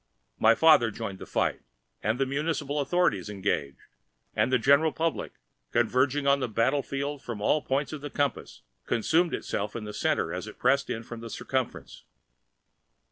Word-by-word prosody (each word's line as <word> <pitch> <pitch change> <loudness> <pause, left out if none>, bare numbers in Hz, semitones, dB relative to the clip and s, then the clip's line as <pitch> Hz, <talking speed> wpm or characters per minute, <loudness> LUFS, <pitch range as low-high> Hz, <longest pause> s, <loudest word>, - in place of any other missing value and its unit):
My 115 +1 +6
father 150 -7 +6
joined 100 -3 -6
the - - -9
fight, - - 0 0.4
the 115 +6 +1
municipal 145 +1 -2
authorities 140 - +1
engaged, 95 -9 -2 0.6
and - - +2
the 130 - +5
general 140 +6 +4
public, 165 +1 -2 0.4
converging 130 +4 +2
on 140 0 +4
the 130 -3 -2
battle 125 +6 +2
field 140 +1 -4
from 115 -3 -6
all 150 +8 +2
points 140 +2 -1
of 150 - -6
the 145 - -5
compass, 145 0 -2 0.2
consumed 160 +9 +2
itself 105 +1 -4
in 115 - -4
the 105 0 -6
center - - 0
as - - -5
it - - -10
pressed 140 0 +2
in 115 - -3
from 115 0 -8
the 115 0 -8
circumference. 130 +2 -4
135 Hz, 165 wpm, -28 LUFS, 115-145 Hz, 0.6 s, My